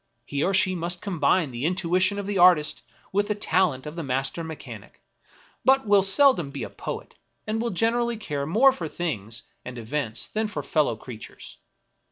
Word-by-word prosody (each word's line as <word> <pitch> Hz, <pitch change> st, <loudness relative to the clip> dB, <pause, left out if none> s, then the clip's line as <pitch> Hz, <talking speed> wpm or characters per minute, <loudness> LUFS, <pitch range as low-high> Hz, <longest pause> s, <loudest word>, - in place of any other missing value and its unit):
He 145 Hz, +1 st, -2 dB
or 195 Hz, -, +2 dB
she 190 Hz, -1 st, +3 dB
must 175 Hz, 0 st, -3 dB
combine 165 Hz, -4 st, +1 dB
the 120 Hz, +1 st, -5 dB
intuition 185 Hz, +3 st, +1 dB
of 200 Hz, -, -3 dB
the 200 Hz, -1 st, -1 dB
artist 175 Hz, -4 st, +5 dB, 0.3 s
with 205 Hz, +1 st, +1 dB
the 210 Hz, -, 0 dB
talent 180 Hz, -9 st, +1 dB
of 150 Hz, +1 st, -7 dB
the 170 Hz, -, -4 dB
master 135 Hz, +3 st, -2 dB
mechanic, 160 Hz, -1 st, -9 dB, 0.6 s
but 270 Hz, -1 st, +4 dB
will 205 Hz, -1 st, +5 dB
seldom 195 Hz, -, +4 dB
be 140 Hz, -3 st, -6 dB
a -, -, -7 dB
poet, -, -, -6 dB, 0.3 s
and 220 Hz, +1 st, -1 dB
will 235 Hz, -, -1 dB
generally 230 Hz, +4 st, +1 dB
care 145 Hz, -9 st, -4 dB
more 235 Hz, +11 st, +5 dB
for 175 Hz, -11 st, -5 dB
things 115 Hz, -, -4 dB, 0.2 s
and 125 Hz, 0 st, -8 dB
events 120 Hz, 0 st, -3 dB
than 220 Hz, 0 st, -2 dB
for 210 Hz, -, -5 dB
fellow 150 Hz, -7 st, +1 dB
creatures. 110 Hz, 0 st, -11 dB
175 Hz, 180 wpm, -25 LUFS, 140-205 Hz, 0.6 s, artist